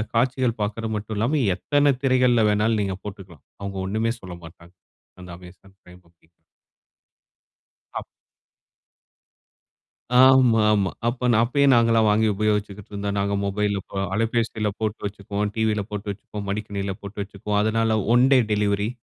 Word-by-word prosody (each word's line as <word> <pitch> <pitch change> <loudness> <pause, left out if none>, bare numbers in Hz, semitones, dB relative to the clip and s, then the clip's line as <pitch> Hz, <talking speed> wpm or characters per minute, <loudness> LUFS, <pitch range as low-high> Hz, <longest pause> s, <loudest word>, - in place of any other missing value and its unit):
காட்சிகள் 125 -1 +1
பார்க்கறது 110 +1 -3
மட்டும் 105 0 -6
இல்லாம, 120 +8 +1 0.2
எத்தனை 145 +5 +2
திரைகள்ல 125 -4 +3
வேணும்னாலும் 105 +1 +1
நீங்க 95 -1 -3
போட்டுக்கலாம். 95 -7 -10 0.2
அவுங்க 100 -1 -5
ஒன்னுமே 110 +4 -1
சொல்லமாட்டாங்க. 85 -1 -12 0.5
அந்த 90 - -11
அமேசான் 95 +2 -16
பிரைம் 90 0 -17
அப்டி. 85 -1 -32 1.7
அப் - - -8 2.1
ஆமா, 130 -3 +6
ஆமா. 100 -3 +1 0.2
அப்பன் 120 -1 0
அப்பயே 140 +4 +1
நாங்கலாம் 115 -2 +4
வாங்கி 110 +1 +3
உபயோகிச்சுக்கிட்டுருந்தோம், 100 -1 -2
நாங்க 100 0 0
மொபைல்ல 100 0 -1
போ - - -8 0.2
அலைபேசியில 115 -1 0
போட்டு 110 0 -2
வச்சுக்குவோம், 100 0 -3
டிவியில 110 -2 0
போட்டு 105 0 -5
வச்சுப்போம். 100 0 -8
மடிக்கணினியில 100 -2 -3
போட்டு 100 +1 -8
வச்சிக்குவோம். 105 +1 -3
அதனால 110 0 +1 0.2
ஒன் 125 +2 +5
டே 130 - +6
டெலிவரி 105 0 0
105 Hz, 125 wpm, -23 LUFS, 100-115 Hz, 2.1 s, ஆமா